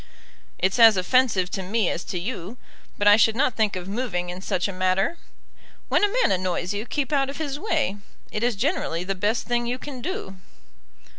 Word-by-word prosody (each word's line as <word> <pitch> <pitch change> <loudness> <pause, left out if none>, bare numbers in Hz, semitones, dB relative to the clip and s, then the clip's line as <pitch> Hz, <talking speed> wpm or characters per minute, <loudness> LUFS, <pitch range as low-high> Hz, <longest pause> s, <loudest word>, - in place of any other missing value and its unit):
"It's 190 +6 0
as 225 -3 +8
offensive 195 -2 +2
to 195 - -3
me 200 +2 0
as 175 - -2
to 180 - -4
you, 195 +2 -5 0.4
but 205 - +1
I 205 0 +8
should 220 0 +4
not 260 0 +2
think 215 -3 0
of 180 0 -5
moving 195 -5 -2
in 180 +1 -8
such 185 -1 -1
a 200 - -5
matter. 185 - 0 0.7
When - - +2
a 410 - +3
man - - +3
annoys 185 0 -1
you, 210 +4 -4
keep 295 0 -2
out 275 -1 +2
of 275 - -6
his 290 -3 -3
way. 310 - 0 0.3
It 210 - -3
is 240 -1 +1
generally 200 - -1
the 195 +2 -2
best 210 +4 -1
thing 240 -1 0
you 245 +1 -1
can 260 -1 -8
do." 235 - -5
210 Hz, 205 wpm, -24 LUFS, 185-255 Hz, 0.7 s, as